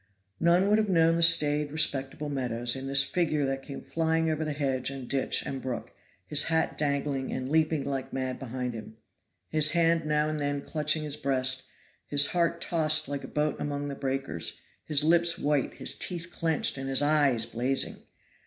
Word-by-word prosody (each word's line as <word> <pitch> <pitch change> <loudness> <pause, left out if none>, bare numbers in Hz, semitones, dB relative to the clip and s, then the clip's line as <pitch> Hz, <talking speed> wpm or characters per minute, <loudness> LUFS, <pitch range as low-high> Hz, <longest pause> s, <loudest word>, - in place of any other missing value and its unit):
None 175 +3 +3
would 210 +1 +4
have 215 -2 0
known 165 -2 +4
the 170 - 0
staid, 150 -3 +4
respectable 145 -1 0
Meadows, 120 -4 -1
in 135 0 -5
this 135 0 +4
figure 155 -2 0
that 135 0 -2
came 140 0 -9
flying 160 0 0
over 155 0 -2
hedge 135 -3 -1
and 135 -2 -7
ditch 135 0 0
and 135 -1 -5
brook, 125 -2 -5 0.3
his 150 +6 +2
hat 160 0 0
dangling 140 -2 -1
and 130 0 -4
leaping 155 0 +1
like 135 -2 -4
mad 130 -1 -3
behind 125 -1 -4
him, 110 0 -9 0.5
his 155 -1 +3
hand 165 -2 +2
now 150 0 +1
and 155 0 -3
then 145 -1 -2
clutching 155 0 0
his 150 -1 -5
breast, 130 -2 +1 0.4
his 145 0 +3
heart 170 -1 0
tossed 155 -2 +1
like 140 -1 -4
a - - -7
boat 150 0 -1
among 145 0 -3
the - - -4
breakers, 135 - -3 0.2
his 150 -2 +2
lips 170 +2 +3
white, 145 -5 0
his - - +3
teeth 175 -1 -4
clinched 160 -5 0
and 135 0 -4
his 135 +2 +2
eyes 145 -6 +3
blazing! 125 +4 -1
145 Hz, 180 wpm, -28 LUFS, 135-160 Hz, 0.5 s, would